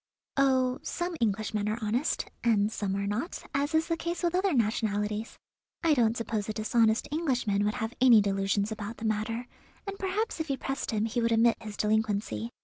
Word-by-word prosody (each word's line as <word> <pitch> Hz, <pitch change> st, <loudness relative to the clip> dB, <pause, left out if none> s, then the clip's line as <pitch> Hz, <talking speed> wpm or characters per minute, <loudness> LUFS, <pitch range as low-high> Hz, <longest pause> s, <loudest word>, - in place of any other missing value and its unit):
"Oh, 260 Hz, -2 st, +2 dB
some 345 Hz, 0 st, -3 dB
Englishmen 210 Hz, -1 st, 0 dB
are 215 Hz, -, -1 dB
honest, 235 Hz, +6 st, 0 dB, 0.2 s
and 215 Hz, -3 st, +3 dB
some 200 Hz, -3 st, -2 dB
are 200 Hz, 0 st, -1 dB
not, 220 Hz, -, -3 dB
as 290 Hz, +3 st, 0 dB
is 320 Hz, 0 st, +3 dB
the 330 Hz, -, +1 dB
case 340 Hz, +2 st, -4 dB
with 345 Hz, -1 st, +1 dB
other 375 Hz, +2 st, +2 dB
nationalities. 215 Hz, -3 st, 0 dB, 0.5 s
I 325 Hz, -2 st, +4 dB
don't 235 Hz, -4 st, +2 dB
suppose 220 Hz, -2 st, -2 dB
a -, -, -1 dB
dishonest 220 Hz, +1 st, +2 dB
Englishman 250 Hz, -10 st, 0 dB
would 210 Hz, +3 st, 0 dB
have 225 Hz, -1 st, -3 dB
any 245 Hz, -4 st, +8 dB
delusions 200 Hz, +1 st, 0 dB
about 220 Hz, +1 st, -5 dB
the 225 Hz, -, -6 dB
matter, 220 Hz, +3 st, -1 dB, 0.4 s
and 395 Hz, -1 st, -6 dB
perhaps 390 Hz, +2 st, -1 dB
if 320 Hz, -1 st, -3 dB
you 275 Hz, -, 0 dB
pressed 270 Hz, +1 st, -3 dB
him 215 Hz, -2 st, 0 dB
he 230 Hz, +2 st, -1 dB
would 230 Hz, 0 st, +1 dB
admit 230 Hz, 0 st, +3 dB
his 215 Hz, -2 st, -8 dB
delinquency. 210 Hz, -, 0 dB
225 Hz, 190 wpm, -29 LUFS, 210-270 Hz, 0.5 s, any